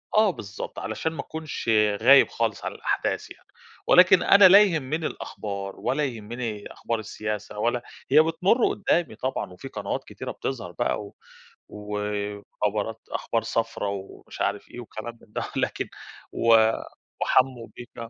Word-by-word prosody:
آه 215 -1 +6
بالضبط 100 - -7
علشان 160 - -3
ما 150 - -9
أكونش 160 -6 -5 0.3
غايب 135 +4 +7
خالص 115 -3 -2
على - - -4
الأحداث - - -2
يعني. - - -14 0.4
ولكن 180 0 +7
أنا 200 -1 +8
لا 200 +3 +9
يهمني 160 -4 0
الأخبار 100 -2 -6
ولا 145 +2 0
يهمني 115 -2 -5
أخبار 115 -1 -3
السياسة 105 -1 -5
ولا 120 +2 +1 0.3
هي 155 +2 +8
بتمرّ 185 +9 +2
قدّامي 170 - 0
طبعًا 130 -7 -3
وفي 115 +9 -9
قنوات 105 -5 -4
كتيرة - - -7
بتظهر 110 -10 -5
بقى - - -1
و - - -14 0.5
وخبرات 105 +1 -3
أخبار 115 -1 -1
صفرا 115 -2 -2
ومش 100 -1 -7
عارف 105 - -1
إيه 120 - -9
وكلام 115 0 -8
من 105 - -20
ده، - - -2
لكن - - -1 0.4
و 115 -1 +5 0.5
وحموّ 130 -3 +2
بيّكَا... 120 -1 -9
115 Hz, 145 wpm, -25 LUFS, 105-145 Hz, 0.5 s, لا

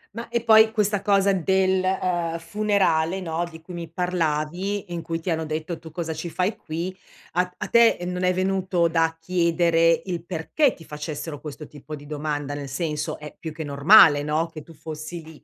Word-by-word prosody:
Ma 230 0 -6
e 235 -1 -1
poi 220 -1 +7
questa 210 -2 +1
cosa 200 -1 +3
del, 190 +1 +2
uhm, 175 -3 0
funerale 190 -2 +1
no, 170 -2 -2
di 160 -1 -12
cui 180 +2 -10
mi 170 -1 -6
parlavi, 180 +2 -2
in 170 - -3
cui 165 0 -3
ti 170 +1 -3
hanno 160 0 -1
detto: 155 +2 -4
"Tu 160 - -11
cosa 160 0 -4
ci 160 +2 -5
fai 185 +5 -1
qui", 170 +4 -5 0.4
a 180 +1 +1
a - - -4
te 235 -1 +5
non 180 0 -3
è 180 - +4
venuto 185 -2 +1
da 165 0 +1
chiedere 170 -1 +2
il 175 -3 -4
perché 185 - 0
ti 165 - -15
facessero 150 0 -6
questo 150 0 -8
tipo 150 +1 -9
di 145 0 -12
domanda, 145 -1 -3
nel 145 -1 -6
senso, 150 +1 -3
è 150 -1 -10
più 160 - -5
che 160 +1 -6
normale 145 +1 +6
no, 155 +3 0
che 155 - -7
tu 165 - -15
fossi 155 +2 -7
lì; 160 -1 -14
165 Hz, 195 wpm, -24 LUFS, 155-185 Hz, 0.4 s, poi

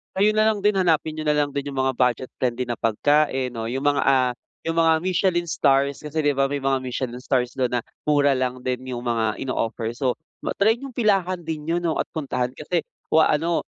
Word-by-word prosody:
Ayun 210 +3 +3
na 215 - +4
lang 220 -1 +2
din 205 +1 +2
hanapin 160 -4 +1
nyo 155 - -4
na 150 - +2
lang 145 -1 0
din 140 0 -3
yung 135 - -4
mga 130 -1 +1
budget-friendly 125 0 -1
na 120 - -2
pagkain 135 +4 +1
'no, 115 - -4
yung 130 +5 -2
mga 145 -1 +2
ah, 130 -2 +3 0.4
yung 165 - 0
mga 165 -1 +4
Michelin 175 -1 +1
Stars 140 -2 +1
kasi 150 +1 -3
'di 145 -2 +2
ba, 135 0 +1
may 145 - -1
mga 135 -1 0
Michelin 125 0 -4
Stars 125 -2 0
dun 130 -2 0
na 125 - +1 0.2
mura 145 -2 +3
lang 130 0 -1
din 125 0 -3
yung 120 - -3
mga 110 -2 0
ino-offer. 115 -3 -2
So, 130 +2 -1 0.2
ma-try 220 +3 +2
yung 275 - -6
pilahan 195 -6 +1
din 160 -3 -5
yun 165 +3 0
'no, 170 -2 -1
at - - -2
puntahan 125 -5 -2
kasi 155 +5 -2 0.2
o 160 0 +5
ah, - - +3
ano 170 +1 0
140 Hz, 220 wpm, -23 LUFS, 125-165 Hz, 0.4 s, o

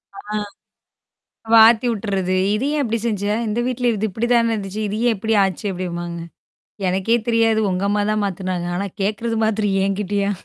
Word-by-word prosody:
ஆ. - - -9 1.3
மாத்தி 225 +1 +7
விட்டுறது. 195 -4 -1 0.2
இது 230 +6 -1
ஏன் 295 - +1
இப்படி 230 -2 -1
செஞ்சா? 205 -2 -1
இந்த 215 +2 -1
வீட்ல 250 -1 0
இது 215 +1 -1
இப்படி 225 +5 -2
தான 230 -1 +3
இருந்துச்சு? 205 0 -4
இது 205 +1 -3
ஏன் 230 - +2
எப்படி 220 +3 -1
ஆச்சு 190 +1 -2
அப்படிம்பாங்க, 175 -2 -5 0.7
எனக்கே 190 +5 +1
தெரியாது. 225 -1 +3
உங்க 180 +1 -2
அம்மா 205 0 +1
தான் 215 -1 0
மாத்துனாங்க. 185 -2 -3
ஆனா 200 +3 -2
கேட்கறது 225 +3 -1
மாத்திரம் 210 -2 0
என்கிட்டயா? 200 0 -1
210 Hz, 160 wpm, -20 LUFS, 190-225 Hz, 1.3 s, மாத்தி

